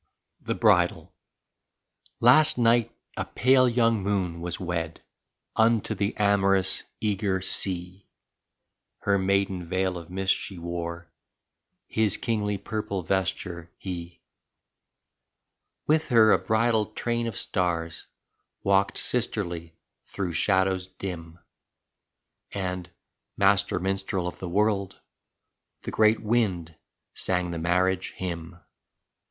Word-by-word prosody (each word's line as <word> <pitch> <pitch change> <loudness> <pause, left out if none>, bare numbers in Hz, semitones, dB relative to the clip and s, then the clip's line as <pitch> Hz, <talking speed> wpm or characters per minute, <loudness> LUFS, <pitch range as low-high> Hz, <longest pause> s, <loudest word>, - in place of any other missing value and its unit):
35 - - -24
THE - - 0
BRIDAL - - +2 1.1
Last 155 +6 +6
night 115 -1 +3 0.3
a - - 0
pale 130 0 +3
young 115 -3 +2
Moon 95 -4 -1
was 85 0 -4
wed 85 -3 -4 0.5
Unto 110 -1 +2
the 100 0 -2
amorous, 100 -2 +2 0.2
eager 100 -2 0
Sea; 90 0 0 0.9
Her 100 -1 +2
maiden 95 -2 0
veil 95 -1 0
of 85 - -12
mist 95 +1 +2
she 95 - -6
wore 85 -1 -5 0.7
His 110 -3 +1
kingly 105 -3 -1
purple 105 -2 -4
vesture, 90 -2 -2
he. 85 -2 -7 1.6
With 155 +1 +2
her 110 -3 +6
a - - +5
bridal 110 -1 +1
train 115 +2 -2
of 115 - -5
stars 85 -2 -2 0.6
Walked 100 0 +2
sisterly 85 -9 -2 0.3
through 90 -3 -4
shadows 95 +1 +1
dim, 85 -3 -7 1.1
And, 90 -2 -4 0.5
master 100 0 +3
minstrel 95 -1 -2
of 90 - -7
the 90 - -5
world. 100 0 0 0.8
The - - -5
great 110 0 +4
Wind 100 -8 0 0.4
sang 90 -1 -1
the 85 - -4
marriage 90 +2 +1
hymn. 85 -1 -6
95 Hz, 110 wpm, -26 LUFS, 90-105 Hz, 1.6 s, Last